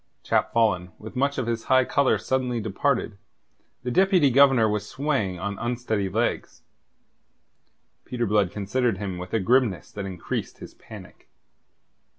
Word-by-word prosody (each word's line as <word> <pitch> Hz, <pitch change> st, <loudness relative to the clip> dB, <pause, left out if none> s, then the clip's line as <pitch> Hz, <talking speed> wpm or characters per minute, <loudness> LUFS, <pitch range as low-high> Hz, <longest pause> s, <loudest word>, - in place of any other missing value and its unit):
Chap -, -, +1 dB
fallen, 90 Hz, -7 st, +1 dB
with 110 Hz, +3 st, -11 dB
much 140 Hz, +2 st, 0 dB
of 130 Hz, -, -1 dB
his 115 Hz, -1 st, -3 dB
high 130 Hz, -1 st, +4 dB
colour 140 Hz, +1 st, +2 dB
suddenly 125 Hz, -2 st, -1 dB
departed, 110 Hz, 0 st, -1 dB, 0.6 s
the 125 Hz, -, -3 dB
Deputy 185 Hz, -, +4 dB
Governor 135 Hz, -3 st, +5 dB
was 105 Hz, -1 st, -2 dB
swaying 130 Hz, -11 st, -1 dB
on 100 Hz, +3 st, -4 dB
unsteady 120 Hz, -4 st, -2 dB
legs. -, -, -2 dB, 1.4 s
Peter 120 Hz, -2 st, -3 dB
Blood 105 Hz, -3 st, +2 dB
considered 105 Hz, +3 st, -1 dB
him 95 Hz, -2 st, -5 dB
with 90 Hz, 0 st, -8 dB
a 115 Hz, -, +1 dB
grimness 110 Hz, -, +1 dB
that 100 Hz, -1 st, -5 dB
increased 90 Hz, -3 st, -5 dB
his -, -, -11 dB
panic. -, -, -14 dB
115 Hz, 145 wpm, -25 LUFS, 100-130 Hz, 1.4 s, Governor